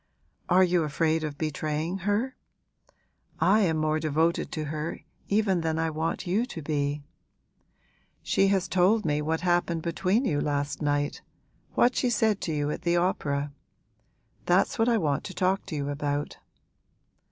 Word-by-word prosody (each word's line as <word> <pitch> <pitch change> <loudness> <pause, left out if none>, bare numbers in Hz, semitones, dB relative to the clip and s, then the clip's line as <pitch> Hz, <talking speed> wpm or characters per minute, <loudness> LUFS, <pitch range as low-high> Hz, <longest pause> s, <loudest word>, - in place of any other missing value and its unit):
'Are 185 +1 +6
you 180 -1 +3
afraid 160 +1 0
of 150 -2 -4
betraying 155 +3 -2
her? 205 +7 -1 1.0
I 210 +3 +4
am 170 -6 +2
more 155 0 +1
devoted 160 +2 0
to 155 - -2
her 155 +2 -4 0.3
even 200 -4 +2
than 160 -1 -1
I 160 0 0
want 160 +4 -2
you 190 +6 +1
to 245 - -6
be. 145 -1 -1 1.2
She 195 - +2
has 195 -1 +1
told 195 +4 +3
me 150 -1 +1
what 160 +2 -1
happened 175 -2 +1
between 190 +8 +1
you 145 -9 +1
last 145 0 -2
night 145 -1 0 0.5
what 245 +1 +4
she 250 - +1
said 220 -3 +1
to 165 - -2
you 145 -1 -1
at - - -4
the 175 0 +1
opera. 145 -5 -1 0.9
That's 180 +5 +2
what 225 +2 +3
I 235 - +3
want 145 -8 0
to 190 - -7
talk 190 +2 0
to 170 - -4
you 140 -1 -2
about.' 145 0 -3
165 Hz, 160 wpm, -27 LUFS, 150-190 Hz, 1.2 s, Are